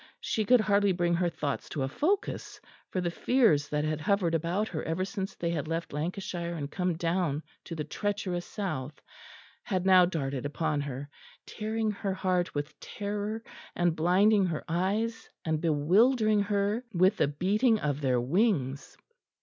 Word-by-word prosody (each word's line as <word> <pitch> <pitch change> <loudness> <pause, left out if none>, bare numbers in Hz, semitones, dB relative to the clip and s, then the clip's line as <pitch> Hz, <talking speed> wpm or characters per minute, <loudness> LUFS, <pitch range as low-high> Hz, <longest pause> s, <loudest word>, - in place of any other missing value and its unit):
She 215 - -1
could 245 +2 +6
hardly 205 -2 +3
bring 175 -1 +1
her 175 0 +2
thoughts 150 -4 -3
to 140 - -2
a - - 0
focus, 360 - -1 0.3
for 185 - -1
the 175 -1 -1
fears 175 - +3
that 150 0 0
had 155 0 -1
hovered 190 -2 +1
about 170 +6 0
her 155 - -3
ever 165 +3 -1
since 195 -2 -4
they 170 -1 -2
had 155 -2 -2
left 165 -1 -3
Lancashire 170 +2 -3
and 145 -2 -5
come 180 -3 -1
down 165 -3 0 0.2
to 170 - -6
the 155 - -3
treacherous 190 +1 -2
south, 155 -9 -4 0.6
had 185 -4 -2
now 185 -2 +7
darted 140 -7 -2
upon 145 0 -1
her, 140 0 -5 0.4
tearing 220 0 -2
her 200 -2 -3
heart 180 -3 0
with 145 +1 -4
terror 210 +2 -4 0.3
and 175 -2 +2
blinding 190 +5 +4
her 160 -3 -3
eyes, 200 +7 -1 0.2
and 160 -1 0
bewildering 210 - +3
her 205 +3 0
with 185 +3 +3
the - - +3
beating 205 - +2
of 145 -3 -1
their 130 -3 +2
wings. 140 - 0
175 Hz, 165 wpm, -29 LUFS, 155-205 Hz, 0.6 s, now